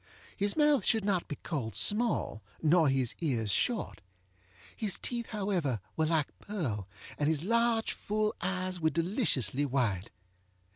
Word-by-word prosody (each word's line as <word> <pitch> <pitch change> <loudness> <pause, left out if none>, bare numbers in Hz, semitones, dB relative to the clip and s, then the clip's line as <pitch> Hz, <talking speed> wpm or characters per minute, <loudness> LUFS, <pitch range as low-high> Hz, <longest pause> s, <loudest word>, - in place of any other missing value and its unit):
His 200 +5 -1
mouth 295 -6 +4
should 220 -1 +1
not 195 -4 0
be 145 - -4
called 130 - -4
small, 205 - +2 0.2
nor 160 -1 +4
his 130 -3 +1
ears 120 -10 0
short. 235 - 0 0.7
His 210 -4 -1
teeth, 235 -2 -3
however, 190 - -1 0.2
were 160 - +1
like 155 -3 -1
pearl, 130 - -3 0.3
and 145 0 +2
his 160 -1 0
large 230 +2 +2
full 215 +1 -1
eyes 185 0 -2
were 160 -1 +2
deliciously 155 - +1
white. 120 -8 0
170 Hz, 140 wpm, -31 LUFS, 135-210 Hz, 0.7 s, mouth